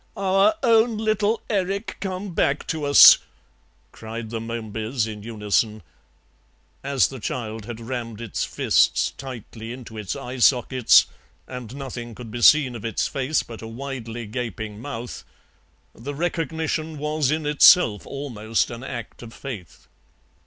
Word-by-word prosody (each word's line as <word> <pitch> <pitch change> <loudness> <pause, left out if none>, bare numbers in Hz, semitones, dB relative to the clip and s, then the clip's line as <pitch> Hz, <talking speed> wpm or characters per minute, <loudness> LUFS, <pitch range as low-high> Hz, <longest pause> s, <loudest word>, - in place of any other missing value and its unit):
"Our 195 +9 +3
own 230 -1 +4
little 215 0 0
Erik 200 +1 -2
come 190 -1 -4
back 140 -2 +1
to 155 -2 -2
us," 145 -1 +9 0.7
cried 110 0 -7
the 115 - -3
Momebys 115 +1 -3
in 105 -2 -7
unison; 110 0 -1 1.0
as 135 -1 +2
the 135 - -8
child 110 -1 -4
had 120 0 -7
rammed 115 -2 -5
its 115 -4 -3
fists - - +2
tightly 120 -3 -8
into 120 -3 -9
its 105 -3 -4
eye 130 -2 -7
sockets 125 0 +5 0.4
and 125 -1 -8
nothing 120 -4 -7
could 115 -2 -9
be 120 +1 -5
seen 135 -2 +6
of 115 - -8
its 115 -4 -1
face 140 +3 -1
but 115 -2 -10
a 110 - -7
widely 120 -1 -6
gaping 110 -2 -5
mouth, 120 -3 -6 0.7
the 140 +5 -7
recognition 160 -1 -2
was 150 -1 0
in 155 +1 -1
itself 145 - +6
almost 115 -6 -2
an 120 +1 -7
act 120 -3 -7
of 115 -2 -10
faith. 115 -11 -9
125 Hz, 140 wpm, -23 LUFS, 115-150 Hz, 1.0 s, us